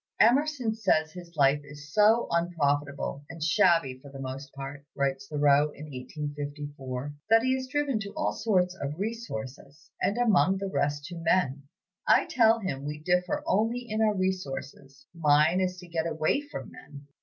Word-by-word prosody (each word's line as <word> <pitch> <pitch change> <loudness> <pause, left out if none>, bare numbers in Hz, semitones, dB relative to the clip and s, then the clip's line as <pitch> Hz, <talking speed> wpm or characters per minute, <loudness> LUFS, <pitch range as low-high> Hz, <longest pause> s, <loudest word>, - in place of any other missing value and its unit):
"Emerson 265 -2 +3
says 170 -8 +1
his 175 0 -11
life 145 0 +4
is 145 +1 -12
so 215 +3 +5
unprofitable 145 -4 -1
and 165 -1 -6
shabby 160 -4 +3
for 140 - -13
the 135 0 -10
most 135 +1 -6
part," 140 0 -7
writes 135 -1 -1
Thoreau 145 -1 +4
in 150 - -9
1854, 145 -1 -6 0.2
"that 225 +1 +6
he 260 +1 +2
is 260 0 -2
driven 280 -3 0
to 200 -1 -5
all 310 - 0
sorts 185 -5 +1
of 140 +2 -3
resources, 150 - -6
and 205 - +1
among 195 -7 +3
the 195 0 -4
rest 145 0 0
to 175 +2 -7
men. 145 -5 +1 0.4
I - - +5
tell 225 -2 +4
him 140 -9 -3
we 150 +1 -4
differ 180 - 0
only 240 -4 +1
in 215 0 -1
our 215 -1 +3
resources: 140 -7 -4
mine 155 +2 +3
is 185 0 -1
to 180 - -11
get 165 -1 -2
away 160 - +1
from - - -7
men. 140 0 -12
160 Hz, 165 wpm, -28 LUFS, 140-200 Hz, 0.4 s, that